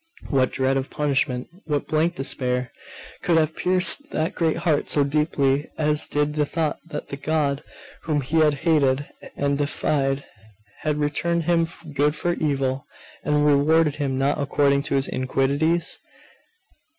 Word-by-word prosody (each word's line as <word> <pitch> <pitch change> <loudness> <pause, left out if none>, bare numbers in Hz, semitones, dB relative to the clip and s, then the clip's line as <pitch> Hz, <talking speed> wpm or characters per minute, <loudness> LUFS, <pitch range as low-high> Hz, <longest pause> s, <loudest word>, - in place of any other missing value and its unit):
What 130 -3 +2
dread 135 0 +1
of 135 0 -3
punishment, 135 -4 0 0.2
what 150 -3 -1
blank 160 +3 +1
despair, 125 -2 -2 0.5
could 170 -2 +2
have 160 -1 +1
pierced 185 - +2
that 160 +3 -1
great 165 -2 0
heart 165 -3 0
so 145 - +3
deeply 140 -1 +1
as 150 -1 +2
did 150 0 0
the 150 0 +1
thought 155 0 -2
that 150 -2 -6
the 140 - -5
God 145 -1 0 0.4
whom 150 -3 +1
he 150 +5 -1
had 155 -2 +4
hated 145 -4 +3 0.3
and 140 0 0
defied 140 -1 0 0.5
had 150 -1 -1
returned 165 +3 0
him 165 0 +2 0.3
good 145 +2 +2
for 175 -1 0
evil, 135 -4 -1 0.4
and 150 0 +2
rewarded 150 +1 +3
him 135 -3 -1
not 140 +2 +1
according 140 0 +2
to - - +1
his 135 0 +1
iniquities? 140 +6 0
145 Hz, 150 wpm, -23 LUFS, 140-160 Hz, 0.5 s, had